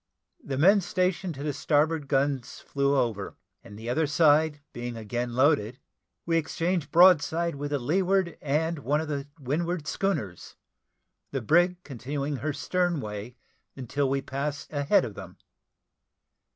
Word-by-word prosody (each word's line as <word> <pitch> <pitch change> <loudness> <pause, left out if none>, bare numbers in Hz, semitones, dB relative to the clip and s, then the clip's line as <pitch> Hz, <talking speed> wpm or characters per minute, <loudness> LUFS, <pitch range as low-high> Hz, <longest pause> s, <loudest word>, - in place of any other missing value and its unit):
The 135 -2 -4
men 195 +8 +5
stationed 185 -2 -1
to 140 - -7
the 150 -1 -1
starboard 150 +1 +1
guns 135 -2 -1
flew 140 0 0
over, 115 -6 -1 0.3
and 105 - -12
the 110 +2 -8
other 150 +6 +1
side 150 0 +3
being 120 -1 -5
again 120 +2 -3
loaded, 130 -4 +2 0.5
we 165 -1 +2
exchanged 165 0 -1
broadsides 170 -2 +5
with 145 +1 -4
the 145 - 0
leeward 180 +5 +1
and 155 +3 0
one 145 +2 0
of 160 - -3
the 140 -1 -3
windward 160 +4 -2
schooners, 110 - -3 0.7
the 135 - -2
brig 175 - +3
continuing 140 +2 -4
her 150 +5 -2
stern 175 +3 0
way 105 +1 -6 0.4
until 135 +2 -1
we 135 0 -1
passed 140 +3 -4
a 145 - -1
head - - +4
of - - -7
them. - - -10
145 Hz, 150 wpm, -27 LUFS, 135-165 Hz, 0.7 s, men